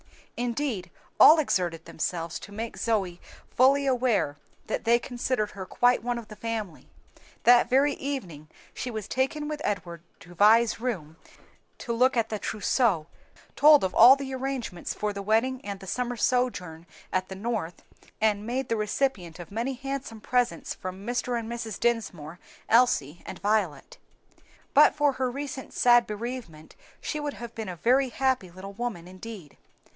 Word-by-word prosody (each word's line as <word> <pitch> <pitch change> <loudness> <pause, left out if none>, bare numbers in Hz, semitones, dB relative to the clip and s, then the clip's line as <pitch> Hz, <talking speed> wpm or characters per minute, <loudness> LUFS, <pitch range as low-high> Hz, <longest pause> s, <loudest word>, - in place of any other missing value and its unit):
Indeed 240 -6 -2 0.3
all 315 - +9
exerted 175 - 0
themselves 165 0 -3
to - - -11
make 225 +3 -5
Zoe 195 -6 -1 0.3
fully 275 +3 +4
aware 245 - +1 0.3
that - - -3
they 235 +1 +4
considered 240 -3 -2
her 190 -2 -8
quite 245 0 +3
one 240 +1 -2
of 235 -2 -8
the 215 - -9
family. 215 -5 -5 0.6
That 240 0 +6
very 275 +3 +3
evening 185 - -5 0.3
she 255 - -5
was 220 -3 -5
taken 295 +5 -1
with 300 0 -4
Edward 175 -4 -3 0.2
to 175 - -13
Vi's 220 +6 +4
room 180 -11 -4 0.6
to 235 - -4
look 250 +2 +3
at 225 -1 +1
the 215 - -3
trousseau, 210 - +1 0.5
told 300 -1 +7
of 190 - -1
all 245 +4 +9
the 275 -1 -6
arrangements 260 -9 -4
for 210 -1 -2
the 200 - -5
wedding 225 +6 +1
and 200 -1 -5
the 190 - -11
summer 245 +5 -2
sojourn 180 -11 -1 0.3
at 185 0 0
the 190 - -6
North, 205 -4 -4 0.4
and 210 -2 +1
made 255 +2 -2
the 230 - +1
recipient 210 - -1
of 175 0 -10
many 235 +5 -2
handsome 270 -3 -5
presents 245 +2 0
from 185 +2 -8
Mr. 245 +1 -1
and 230 -1 -4
Mrs. 230 -3 -5
Dinsmore, 195 -9 -2 0.3
Elsie, 220 - +3
and - - -6
Violet. 210 - -1 0.7
But - - +6
for 295 -1 +3
her 260 -1 -1
recent 275 0 -6
sad 240 -1 +5
bereavement 215 -8 -7 0.2
she 305 - -4
would 295 -1 -4
have 235 0 -8
been 220 -4 -5
a 180 - -5
very 255 +9 +2
happy 260 -7 0
little 190 +3 -10
woman 205 -6 -5
indeed. 185 -4 -10
230 Hz, 160 wpm, -27 LUFS, 190-255 Hz, 0.7 s, all